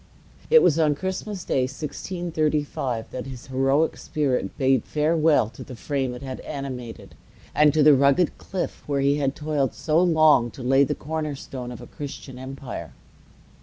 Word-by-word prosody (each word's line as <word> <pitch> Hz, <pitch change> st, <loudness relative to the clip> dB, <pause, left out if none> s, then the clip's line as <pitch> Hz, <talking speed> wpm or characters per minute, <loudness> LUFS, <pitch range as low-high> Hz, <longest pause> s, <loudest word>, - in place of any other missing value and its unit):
It 475 Hz, 0 st, +7 dB
was 160 Hz, 0 st, +4 dB
on 150 Hz, -2 st, +3 dB
Christmas 190 Hz, +3 st, -4 dB
Day, 130 Hz, -, +1 dB
1635, 150 Hz, -5 st, -3 dB
that 130 Hz, +1 st, -5 dB
his 130 Hz, -2 st, -9 dB
heroic 135 Hz, +4 st, +1 dB
spirit 140 Hz, -4 st, -2 dB
bade 135 Hz, -3 st, +3 dB
farewell 155 Hz, -4 st, +2 dB
to -, -, -10 dB
the 125 Hz, -, -9 dB
frame 135 Hz, -1 st, -2 dB
it 125 Hz, -, -9 dB
had 130 Hz, -1 st, -6 dB
animated, 130 Hz, -5 st, -7 dB, 0.4 s
and 150 Hz, -1 st, +5 dB
to 155 Hz, +1 st, +3 dB
the 150 Hz, 0 st, +8 dB
rugged 140 Hz, +5 st, +3 dB
cliff 190 Hz, -2 st, -4 dB
where 140 Hz, -1 st, 0 dB
he 140 Hz, +1 st, +3 dB
had 140 Hz, -2 st, 0 dB
toiled 150 Hz, -3 st, -1 dB
so 160 Hz, +1 st, +2 dB
long 155 Hz, -8 st, +4 dB
to 130 Hz, -, -7 dB
lay 135 Hz, +2 st, +4 dB
the 135 Hz, -, -1 dB
corner 155 Hz, -1 st, -4 dB
stone 125 Hz, -2 st, -7 dB
of 120 Hz, -, -9 dB
a -, -, -9 dB
Christian 135 Hz, -2 st, -8 dB
empire. 130 Hz, -, -7 dB
140 Hz, 165 wpm, -24 LUFS, 130-155 Hz, 0.4 s, the